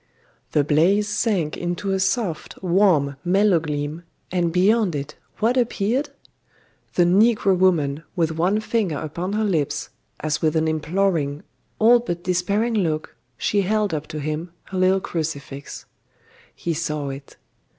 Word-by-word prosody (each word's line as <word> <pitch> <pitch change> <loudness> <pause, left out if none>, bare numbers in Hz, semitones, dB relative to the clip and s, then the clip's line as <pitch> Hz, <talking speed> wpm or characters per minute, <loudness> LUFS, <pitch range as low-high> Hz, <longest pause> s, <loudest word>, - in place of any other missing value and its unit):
The 150 - +4
blaze 175 +8 +3
sank 200 -7 0
into 175 +3 -3
a 190 - +1
soft, 195 -4 -1
warm, 170 -7 +3
mellow 190 0 +3
gleam, 150 +1 -4 0.3
and 175 -2 +1
beyond 195 +1 +3
it 145 +1 -4 0.2
what 235 +4 +1
appeared? 245 +3 0 0.9
The 175 - +5
negro 200 +2 +4
woman, 160 -6 +2
with 165 -2 +1
one 180 +7 +1
finger 215 -8 -1
upon 170 +6 -4
her 215 +1 +1
lips, 165 -9 -1 0.3
as 150 0 -1
with 155 0 +1
an 160 0 +2
imploring, 160 -2 0 0.3
all 235 +2 +6
but 175 -7 -4
despairing 200 +6 0
look, 160 -7 -1 0.2
she 205 - +1
held 210 0 0
up 155 -1 -3
to 155 - -6
him 155 +3 -4 0.2
her 190 - -2
little 190 +1 +3
crucifix. 145 -5 -5 0.7
He 170 - -2
saw 150 -3 -2
it. 135 +1 -9
175 Hz, 140 wpm, -22 LUFS, 155-200 Hz, 0.9 s, all